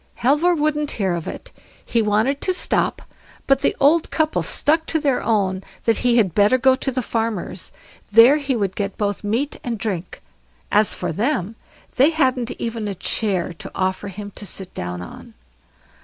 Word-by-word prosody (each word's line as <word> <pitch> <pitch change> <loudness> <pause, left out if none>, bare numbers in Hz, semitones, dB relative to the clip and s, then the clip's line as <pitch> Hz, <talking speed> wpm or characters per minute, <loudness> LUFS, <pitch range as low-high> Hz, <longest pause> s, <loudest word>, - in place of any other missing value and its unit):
Halvor 295 +8 +3
wouldn't 300 -1 0
hear 190 -4 -1
of 170 -2 -4
it—he 230 - -5
wanted 220 +6 +1
to 370 - +1
stop; - - 0 0.4
but 275 0 +3
the - - +1
old 310 +4 +4
couple 315 -1 0
stuck 320 +2 +1
to 320 - +1
their 280 -4 +1
own, 195 -4 0 0.2
that 230 -2 +2
he 245 -1 +3
had 195 -7 +3
better 210 +6 +4
go 260 0 +4
to 270 - -3
the 255 0 -2
farmer's; 225 -6 -3 0.4
there 230 +7 +7
he 280 -3 -1
would 200 -4 -1
get 200 -1 -3
both 205 -1 -2
meat 235 +8 -1
and 235 -2 -3
drink; 190 - -5 0.5
as 210 -1 +4
for - - -3
them, 220 - -1 0.4
they 270 +4 +6
hadn't 260 -6 +1
even 230 -2 -3
a 200 - -3
chair 185 -2 -1
to 165 - -10
offer 190 +2 -1
him 205 +1 -7
to - - -8
sit 185 +1 -6
down 90 0 -5
on. - - -12
230 Hz, 175 wpm, -21 LUFS, 200-275 Hz, 0.5 s, there